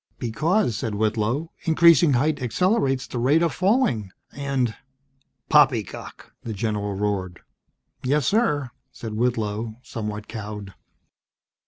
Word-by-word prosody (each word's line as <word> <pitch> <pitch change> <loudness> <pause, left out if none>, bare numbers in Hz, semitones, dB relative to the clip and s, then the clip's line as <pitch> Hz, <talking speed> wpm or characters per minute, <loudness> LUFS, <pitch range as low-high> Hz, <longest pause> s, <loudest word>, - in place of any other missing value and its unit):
"Because," 145 - 0
said 110 -3 -3
Whitlow, 110 +8 0
"increasing 165 -2 +6
height 145 +3 +1
accelerates 135 - +1
the 120 - -5
rate 145 +7 +3
of 170 - +1
falling, 185 - +1 0.2
and 135 -5 -1 0.4
" 135 0 -46
"Poppycock!" - - +1
the 115 - -5
general 105 -1 -2
roared. 95 -3 -2 0.6
"Yes, 140 +2 +1
sir," 150 - +1 0.2
said 115 -4 -7
Whitlow, 110 -1 -1
somewhat 105 -2 -5
cowed. 105 -3 -7
120 Hz, 115 wpm, -24 LUFS, 105-145 Hz, 0.6 s, increasing